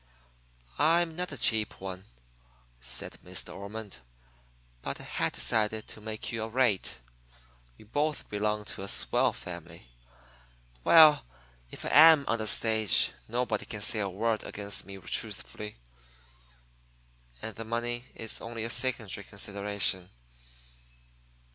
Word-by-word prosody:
"I'm 165 Hz, +1 st, +3 dB
not 180 Hz, 0 st, -2 dB
a 145 Hz, -, -6 dB
cheap 110 Hz, -3 st, +1 dB
one," 95 Hz, 0 st, -7 dB, 0.7 s
said -, -, -4 dB
Miss -, -, -4 dB
De -, -, -10 dB
Ormond. 105 Hz, +1 st, -8 dB, 0.8 s
"But -, -, -4 dB
I -, -, -8 dB
had -, -, -1 dB
decided 110 Hz, -1 st, 0 dB
to 110 Hz, -, -9 dB
make 110 Hz, 0 st, -5 dB
you 115 Hz, -1 st, -3 dB
a 110 Hz, -, -3 dB
rate. 120 Hz, -5 st, +1 dB, 0.8 s
You -, -, -16 dB
both 150 Hz, +7 st, -1 dB
belong 105 Hz, 0 st, -1 dB
to -, -, -5 dB
a 100 Hz, -, -5 dB
swell -, -, +4 dB
family. 85 Hz, -7 st, -9 dB, 0.9 s
Well, 155 Hz, -2 st, +8 dB, 0.5 s
if -, -, -8 dB
I -, -, -1 dB
am 155 Hz, -2 st, +8 dB
on 115 Hz, -, +1 dB
the 110 Hz, -, -2 dB
stage 110 Hz, -1 st, +4 dB, 0.2 s
nobody 120 Hz, -2 st, -1 dB
can 105 Hz, -2 st, -4 dB
say 110 Hz, -, +1 dB
a 100 Hz, -2 st, -1 dB
word 110 Hz, +4 st, -1 dB
against 100 Hz, 0 st, -4 dB
me 100 Hz, 0 st, -8 dB
truthfully. 105 Hz, +2 st, -4 dB, 1.7 s
And 110 Hz, -2 st, -5 dB
the 115 Hz, -, -5 dB
money 120 Hz, +2 st, -2 dB
is 115 Hz, -1 st, -3 dB
only 115 Hz, -1 st, -5 dB
a 115 Hz, -, -2 dB
secondary 115 Hz, -7 st, -1 dB
consideration. 100 Hz, -2 st, -2 dB
110 Hz, 135 wpm, -29 LUFS, 100-120 Hz, 1.7 s, Well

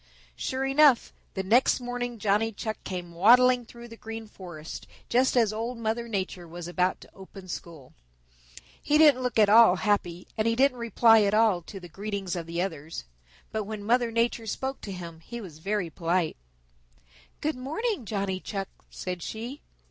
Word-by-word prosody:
Sure 260 Hz, -, -2 dB
enough, 275 Hz, -2 st, +4 dB, 0.2 s
the 190 Hz, -, -2 dB
next 235 Hz, +9 st, +4 dB
morning 245 Hz, -1 st, -4 dB
Johnny 210 Hz, +2 st, +1 dB
Chuck 220 Hz, 0 st, -5 dB
came 175 Hz, -2 st, -6 dB
waddling 245 Hz, +7 st, +5 dB
through 235 Hz, 0 st, -11 dB
the 230 Hz, -, -11 dB
Green 225 Hz, 0 st, -7 dB
Forest 175 Hz, -6 st, -9 dB, 0.2 s
just 255 Hz, +1 st, +3 dB
as 220 Hz, -3 st, +3 dB
Old 230 Hz, +3 st, -3 dB
Mother 230 Hz, +1 st, -2 dB
Nature 190 Hz, -5 st, -3 dB
was 170 Hz, +1 st, -8 dB
about 180 Hz, +1 st, 0 dB
to -, -, -16 dB
open 190 Hz, 0 st, -12 dB
school. 165 Hz, -6 st, -8 dB, 0.9 s
He 300 Hz, -, +3 dB
didn't 295 Hz, -5 st, +6 dB
look 250 Hz, -2 st, -2 dB
at 215 Hz, -2 st, +6 dB
all 220 Hz, -2 st, +7 dB
happy, 180 Hz, -3 st, -1 dB
and 220 Hz, 0 st, 0 dB
he 230 Hz, -, +2 dB
didn't 260 Hz, 0 st, +3 dB
reply 225 Hz, -1 st, +5 dB
at 205 Hz, 0 st, +2 dB
all 215 Hz, -5 st, +4 dB
to 195 Hz, +4 st, -9 dB
the 180 Hz, -, -10 dB
greetings 195 Hz, +2 st, -4 dB
of 170 Hz, -2 st, -5 dB
the 170 Hz, +1 st, -1 dB
others. 160 Hz, -4 st, -6 dB, 0.5 s
But 215 Hz, -1 st, -2 dB
when 215 Hz, 0 st, -6 dB
Old 205 Hz, -, -9 dB
Mother 240 Hz, 0 st, +3 dB
Nature 230 Hz, 0 st, 0 dB
spoke 265 Hz, +5 st, -3 dB
to 200 Hz, -, -6 dB
him 170 Hz, -3 st, -8 dB
he 235 Hz, +8 st, -8 dB
was 170 Hz, -8 st, -10 dB
very 195 Hz, -1 st, -2 dB
polite. 170 Hz, +1 st, 0 dB, 1.0 s
"Good 305 Hz, +1 st, -1 dB
morning, 315 Hz, -, -2 dB
Johnny 195 Hz, -3 st, -2 dB
Chuck," 195 Hz, 0 st, -5 dB, 0.2 s
said 180 Hz, -1 st, -5 dB
she. 235 Hz, -, -6 dB
215 Hz, 180 wpm, -27 LUFS, 185-240 Hz, 1.0 s, all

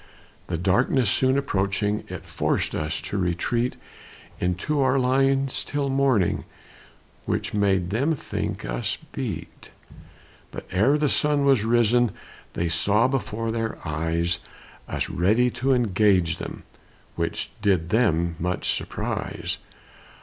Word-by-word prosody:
The 85 Hz, -, -2 dB
darkness 100 Hz, +5 st, +2 dB
soon 130 Hz, +1 st, +3 dB
approaching, 105 Hz, -4 st, 0 dB
It -, -, -7 dB
forced -, -, -1 dB
us 75 Hz, +1 st, -2 dB
to 100 Hz, -, -3 dB
retreat 105 Hz, +8 st, 0 dB, 0.6 s
Into 90 Hz, -, 0 dB
our 130 Hz, 0 st, +3 dB
lines 135 Hz, +1 st, +2 dB
till 145 Hz, -1 st, -2 dB
morning, 135 Hz, -9 st, +2 dB, 0.8 s
Which -, -, -2 dB
made 95 Hz, -3 st, +1 dB
them 140 Hz, +9 st, +1 dB
think -, -, -4 dB
us -, -, -2 dB
beat; 85 Hz, -, -6 dB, 0.8 s
But -, -, -8 dB
ere 110 Hz, +11 st, +3 dB
the 150 Hz, 0 st, +2 dB
sun 145 Hz, 0 st, +2 dB
was 135 Hz, -6 st, +4 dB
risen, 120 Hz, +1 st, +3 dB, 0.4 s
They 85 Hz, -, -1 dB
saw 100 Hz, +8 st, +3 dB
before 115 Hz, -4 st, -2 dB
their 115 Hz, 0 st, -2 dB
eyes 85 Hz, +2 st, 0 dB, 0.5 s
Us -, -, -2 dB
ready 110 Hz, +8 st, +2 dB
to 130 Hz, +3 st, 0 dB
engage 100 Hz, -7 st, +3 dB
them, -, -, -7 dB, 0.5 s
Which -, -, -2 dB
did 90 Hz, -5 st, +2 dB
them 85 Hz, -8 st, +2 dB
much 90 Hz, +2 st, 0 dB
surprise. -, -, -4 dB
110 Hz, 120 wpm, -25 LUFS, 90-130 Hz, 0.8 s, was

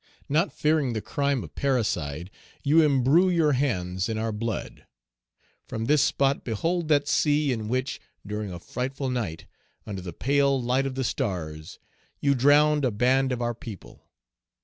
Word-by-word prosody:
Not 160 Hz, +7 st, +1 dB
fearing 150 Hz, -5 st, +1 dB
the 110 Hz, -, -1 dB
crime 140 Hz, 0 st, -1 dB
of -, -, -11 dB
parricide, 90 Hz, -, -1 dB, 0.3 s
you 150 Hz, +3 st, +5 dB
imbrue 150 Hz, +5 st, +4 dB
your 165 Hz, -4 st, +3 dB
hands 95 Hz, -9 st, -1 dB
in 110 Hz, -, -2 dB
our 110 Hz, +1 st, -1 dB
blood. 110 Hz, 0 st, -5 dB, 0.8 s
From 110 Hz, 0 st, -4 dB
this 145 Hz, +3 st, +4 dB
spot 140 Hz, -1 st, +1 dB
behold 165 Hz, -, -1 dB
that 145 Hz, -2 st, +3 dB
sea 150 Hz, -2 st, +2 dB
in 110 Hz, -3 st, -4 dB
which, 130 Hz, +4 st, -2 dB, 0.2 s
during 105 Hz, -1 st, -4 dB
a 90 Hz, -, -6 dB
frightful 130 Hz, +8 st, -4 dB
night, 105 Hz, -11 st, -3 dB, 0.4 s
under 100 Hz, -3 st, -5 dB
the 90 Hz, -1 st, -6 dB
pale 140 Hz, -, +2 dB
light 125 Hz, +2 st, +1 dB
of 130 Hz, -, -5 dB
the 135 Hz, -, -1 dB
stars, 80 Hz, -9 st, -3 dB, 0.4 s
you 140 Hz, -1 st, +2 dB
drowned 145 Hz, +3 st, +4 dB
a 130 Hz, -, +3 dB
band 130 Hz, +4 st, +2 dB
of 120 Hz, -1 st, -2 dB
our 120 Hz, 0 st, 0 dB
people. 110 Hz, -4 st, -11 dB
130 Hz, 160 wpm, -26 LUFS, 110-145 Hz, 0.8 s, you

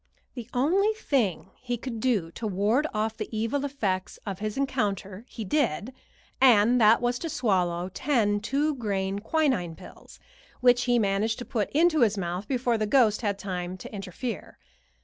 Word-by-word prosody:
The 240 Hz, -3 st, -8 dB
only 370 Hz, -, +2 dB
thing 230 Hz, -, -1 dB
he 245 Hz, -1 st, -3 dB
could 235 Hz, -1 st, -6 dB
do 215 Hz, -9 st, 0 dB
to 220 Hz, -, -5 dB
ward 210 Hz, +9 st, +1 dB
off 220 Hz, 0 st, -1 dB
the -, -, -5 dB
evil 230 Hz, +6 st, -1 dB
effects 210 Hz, -10 st, -2 dB
of 195 Hz, -3 st, -5 dB
his 215 Hz, +2 st, -4 dB
encounter 210 Hz, -6 st, -2 dB
he 225 Hz, -, -6 dB
did, 250 Hz, -, 0 dB, 0.5 s
and 240 Hz, -1 st, +5 dB
that 220 Hz, +2 st, +5 dB
was 245 Hz, 0 st, 0 dB
to 330 Hz, -, -4 dB
swallow 180 Hz, -, 0 dB
ten 205 Hz, 0 st, +1 dB
two 280 Hz, +8 st, 0 dB
grain 200 Hz, -5 st, -2 dB
quinine 230 Hz, -, 0 dB
pills, -, -, -14 dB, 0.4 s
which 245 Hz, -1 st, +4 dB
he 245 Hz, -1 st, +3 dB
managed 210 Hz, +1 st, +1 dB
to 245 Hz, -, -6 dB
put 215 Hz, -5 st, -2 dB
into 320 Hz, +1 st, +3 dB
his 215 Hz, -4 st, +3 dB
mouth 180 Hz, +2 st, -3 dB
before 245 Hz, -2 st, 0 dB
the 215 Hz, -, 0 dB
ghost 220 Hz, -2 st, +3 dB
had 205 Hz, -3 st, -1 dB
time 185 Hz, -2 st, -4 dB
to -, -, -10 dB
interfere. 200 Hz, +3 st, -6 dB
220 Hz, 170 wpm, -27 LUFS, 195-255 Hz, 0.5 s, and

